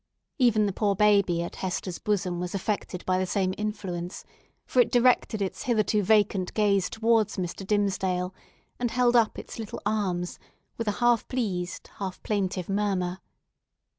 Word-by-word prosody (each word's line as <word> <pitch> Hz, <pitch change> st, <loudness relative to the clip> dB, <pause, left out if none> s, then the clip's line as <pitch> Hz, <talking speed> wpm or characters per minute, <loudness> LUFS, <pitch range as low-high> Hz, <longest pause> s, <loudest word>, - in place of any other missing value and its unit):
Even 225 Hz, -4 st, +4 dB
the 200 Hz, -, -1 dB
poor 200 Hz, 0 st, +1 dB
baby 200 Hz, -4 st, +3 dB
at 170 Hz, -, -7 dB
Hester's 185 Hz, -1 st, -3 dB
bosom 190 Hz, -4 st, -1 dB
was 180 Hz, +2 st, -3 dB
affected 195 Hz, -2 st, -3 dB
by 185 Hz, 0 st, +2 dB
the 185 Hz, -, 0 dB
same 185 Hz, 0 st, 0 dB
influence, 195 Hz, -4 st, -4 dB, 0.4 s
for 255 Hz, -, 0 dB
it 245 Hz, -, +5 dB
directed 240 Hz, -3 st, +3 dB
its 190 Hz, -, -4 dB
hitherto 215 Hz, -3 st, +2 dB
vacant 205 Hz, -2 st, +2 dB
gaze 200 Hz, -3 st, +2 dB
towards 220 Hz, -1 st, +2 dB
Mr. 180 Hz, +1 st, -4 dB
Dimmesdale, 190 Hz, -3 st, 0 dB, 0.5 s
and 245 Hz, -1 st, 0 dB
held 245 Hz, +1 st, +2 dB
up 230 Hz, -2 st, +3 dB
its -, -, -8 dB
little 220 Hz, -2 st, -5 dB
arms 190 Hz, -4 st, -1 dB, 0.4 s
with 230 Hz, -, -4 dB
a 210 Hz, -, +2 dB
half 240 Hz, -2 st, +3 dB
pleased, 185 Hz, -8 st, -3 dB
half 190 Hz, -2 st, -4 dB
plaintive 190 Hz, -4 st, -1 dB
murmur. 195 Hz, -3 st, -1 dB
200 Hz, 155 wpm, -27 LUFS, 185-215 Hz, 0.5 s, it